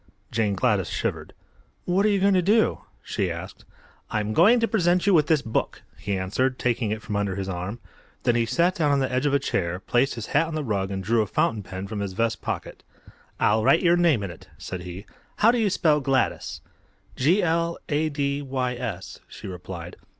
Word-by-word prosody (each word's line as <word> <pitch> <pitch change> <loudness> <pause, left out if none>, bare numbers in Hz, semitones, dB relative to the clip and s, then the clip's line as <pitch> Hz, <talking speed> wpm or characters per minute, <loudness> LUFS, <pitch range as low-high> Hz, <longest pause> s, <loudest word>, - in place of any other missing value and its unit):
Jane 110 -3 +1
Gladys 95 - +1
shivered. - - -3 0.5
"What 190 +4 +2
are - - +3
you 200 -1 +2
going 200 +1 +4
to 185 - +4
do?" 215 +5 +2 0.2
she - - -1
asked. - - -7 0.4
"I'm 105 0 -1
going 215 - +6
to 230 - +2
present 180 -5 +2
you 200 - +4
with 150 -4 +4
this 155 -3 +2
book," 110 - -2
he 100 -1 -3
answered, 125 +8 0
taking 120 -2 0
it 110 +1 -3
from 105 - -4
under 100 -2 -1
his 95 0 -4
arm. 95 +4 -4 0.5
Then 120 - +3
he 115 -1 +1
sat 175 +7 +2
down 150 -5 +1
on 140 - +3
the 135 -1 0
edge 130 +3 +1
of 140 - 0
a - - +6
chair, 90 -10 -1
placed 120 +7 +1
his 115 -2 -5
hat 160 +3 +3
on 160 - -5
the 155 - -2
rug 100 -6 -1
and 95 -1 -4
drew 115 +3 +2
a 105 - -1
fountain 110 +2 0
pen 95 0 -7
from 105 +1 -5
his 100 -2 -3
vest 115 +3 -1
pocket. - - -5 0.6
"I'll 110 +1 +3
write 165 +10 +4
your 170 0 +5
name 165 -11 +3
in 100 - -4
it," 85 - -14
said 95 -1 -6
he. 90 +3 -8 0.3
"How 225 - +5
do 245 - 0
you 215 -3 +2
spell 155 -5 +3
Gladys?" 135 -1 -1 0.5
"G 170 +10 +3
l 170 0 0
a 155 +1 +1
d 140 -1 -1
y 130 -2 -2
s," 115 -7 -6
she - - -11
replied. 90 -1 -8
125 Hz, 215 wpm, -25 LUFS, 100-165 Hz, 0.6 s, going